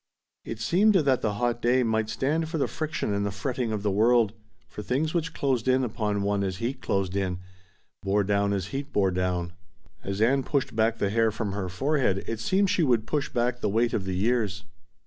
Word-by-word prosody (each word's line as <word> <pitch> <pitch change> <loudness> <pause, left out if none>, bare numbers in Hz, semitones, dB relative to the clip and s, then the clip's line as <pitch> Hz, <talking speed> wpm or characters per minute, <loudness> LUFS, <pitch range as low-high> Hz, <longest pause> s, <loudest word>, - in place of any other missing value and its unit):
It 115 - -6
seemed 195 - +3
that 140 -8 +3
the 105 - 0
hot 120 +2 -1
day 125 +2 +3
might 110 -1 0
stand 155 +7 -1
for 165 - -2
the 140 - +1
friction 155 -9 -3
and 100 0 0
the 100 - 0
fretting 115 +5 -3
of 105 -2 -3
the 105 - +1
world, 110 +1 +3 0.3
for - - -8
things 140 +8 -1
which 165 -1 -1
closed 130 -6 -1
in 130 0 +3
upon 105 -4 -1
one 100 0 0
as 95 -1 -2
heat 120 +5 -3
closed 95 -1 -1
in, 95 -2 -1 0.6
bore 100 +1 +1
down 100 0 +1
as 100 -2 -2
heat 140 +1 -5
bore 95 -2 +2
down. 90 -1 -1 0.5
As 100 0 -3
Ann 130 +5 +3
pushed 135 -3 -1
back 115 +1 +2
the 100 -2 0
hair 115 +1 +3
from 105 -1 -3
her 95 -2 -3
forehead 130 - 0
it 115 -1 -4
seemed 190 - +2
she - - +1
would 120 -8 +2
push 145 -2 -1
back 120 0 0
the - - +1
weight 115 +3 +1
of 95 - -1
the 95 -1 -2
years. 105 -2 0
110 Hz, 215 wpm, -26 LUFS, 100-130 Hz, 0.6 s, seemed